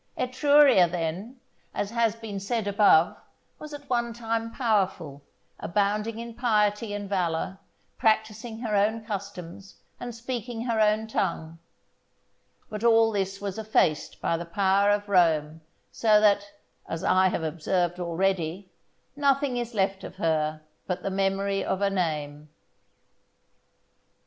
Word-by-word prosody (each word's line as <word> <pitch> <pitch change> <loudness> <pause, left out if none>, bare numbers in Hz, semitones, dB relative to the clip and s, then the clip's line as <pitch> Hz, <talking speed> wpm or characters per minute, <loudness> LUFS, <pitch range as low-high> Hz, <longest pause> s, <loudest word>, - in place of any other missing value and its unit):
Etruria, 270 -6 +5
then, 180 +9 -4 0.4
as 205 - -2
has 230 -2 +1
been 220 -3 -6
said 215 +2 -2
above, 200 -5 +4 0.4
was 305 - -9
at 290 -1 -9
one 235 -2 -1
time 230 -1 -3
powerful, 200 - -1 0.4
abounding 210 +4 -1
in 235 0 -7
piety 215 -2 +1
and 205 0 -4
valour, 185 -1 -2 0.4
practising 220 +1 0
her 220 -4 -1
own 220 +2 +1
customs, 195 -3 -7 0.2
and 240 -2 -6
speaking 235 -1 -5
her 230 -3 0
own 215 0 +3
tongue; 165 -6 -3 1.1
but 210 0 -6
all 225 -1 +5
this 195 -1 -2
was 200 0 -5
effaced 210 -8 0
by 170 - 0
the 170 - -4
power 195 +3 +2
of 205 0 +1
Rome, 160 -5 +2 0.3
so 215 -2 +4
that, 205 -1 +3 0.4
as 165 +2 -4
I 185 -1 +4
have 175 - -2
observed 175 +3 -1
already, 180 +1 -1 0.4
nothing 280 -2 +1
is 240 -1 -4
left 195 -1 0
of 180 - -8
her 155 -4 -1 0.2
but 180 -1 -3
the 195 - -2
memory 195 +1 0
of 190 - -1
a 200 0 +1
name. 150 -5 -3
200 Hz, 135 wpm, -26 LUFS, 180-225 Hz, 1.1 s, Etruria